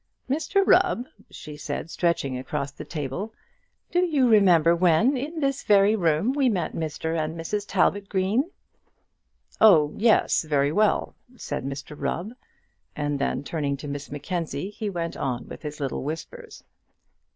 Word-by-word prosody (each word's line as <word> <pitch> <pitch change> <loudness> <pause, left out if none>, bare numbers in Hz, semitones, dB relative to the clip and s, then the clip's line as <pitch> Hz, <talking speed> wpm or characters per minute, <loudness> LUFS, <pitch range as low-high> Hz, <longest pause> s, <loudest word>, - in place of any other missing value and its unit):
"Mr 325 +8 +1
Rubb," 360 -12 +3 0.2
she 150 -1 -9
said, 150 +2 -5
stretching 170 -7 0
across 135 +2 -4
the - - -9
table, 165 - -5 0.6
"do 355 - +2
you 295 -8 +2
remember 175 -7 +5
when, 180 - +3
in 300 +6 -4
this 275 -1 0
very 205 +1 +4
room, 170 +4 +1
we 270 -2 +2
met 180 -8 -1
Mr 160 0 -3
and 160 0 -2
Mrs 205 +5 -3
Talbot 200 0 +1
Green?" 205 - +1 1.1
"Oh 160 -9 +6
yes, 225 +1 +3
very 145 -2 +1
well," 210 +5 +1 0.2
said - - -4
Mr 140 +2 -6
Rubb, 180 +7 -3 0.6
and 145 -1 -2
then 140 - -1
turning 145 -2 -2
to 145 - -8
Miss 140 0 -6
Mackenzie, 170 +5 -4
he 210 0 -4
went 170 -3 -4
on 125 -3 -3
with - - -9
his 150 -1 -7
little 140 -2 -3
whispers. 425 - -7
170 Hz, 150 wpm, -25 LUFS, 150-220 Hz, 1.1 s, Oh